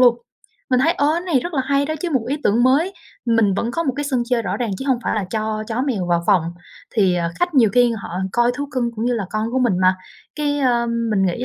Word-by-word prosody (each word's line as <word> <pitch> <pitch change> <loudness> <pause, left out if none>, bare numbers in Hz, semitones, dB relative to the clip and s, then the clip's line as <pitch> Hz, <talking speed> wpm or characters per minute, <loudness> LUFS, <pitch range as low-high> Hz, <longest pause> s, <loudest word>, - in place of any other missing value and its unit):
luôn. 245 -2 +6 0.5
Mình 255 0 +3
thấy, 330 +5 +3
ơ, 290 -6 0
cái 340 - 0
này 335 -8 +1
rất 345 +2 -5
là 265 - +1
hay 280 0 +1
đó 310 - -2
chứ, 350 0 -2
một 255 -6 0
ý 285 - 0
tưởng 225 +4 +3
mới. 295 +9 +3 0.3
Mình 225 -5 +2
vẫn 230 +4 -1
có 335 - -1
một 270 -5 0
cái 290 - -2
sân 260 -4 0
chơi 235 -2 +2
rõ 195 0 -2
ràng 235 -3 -2
chứ - - -5
hông 255 -3 +2
phải - - 0
là 210 -3 -1
cho 215 -1 -2
chó 235 +3 -1
mèo 220 -11 -1
vào 170 -1 +1
phòng, 190 -5 +4 0.5
thì, 195 -5 +3
ờ, 170 -1 -1
khách 350 -3 0
nhiều 230 -6 +5
khi 245 0 +4
họ 200 - -8 0.2
coi 240 0 +3
thú 285 +1 -4
cưng 245 -2 -1
cũng 225 - -2
như 245 0 +1
là 215 -4 -2
con 215 +1 -2
của 260 - +1
mình 230 -8 +2
mà, 185 0 +5 0.4
cái, 290 -1 0
ơ, 240 -3 +2 0.2
mình 195 -2 +2
nghĩ 185 +8 -2
240 Hz, 280 wpm, -20 LUFS, 215-275 Hz, 0.5 s, luôn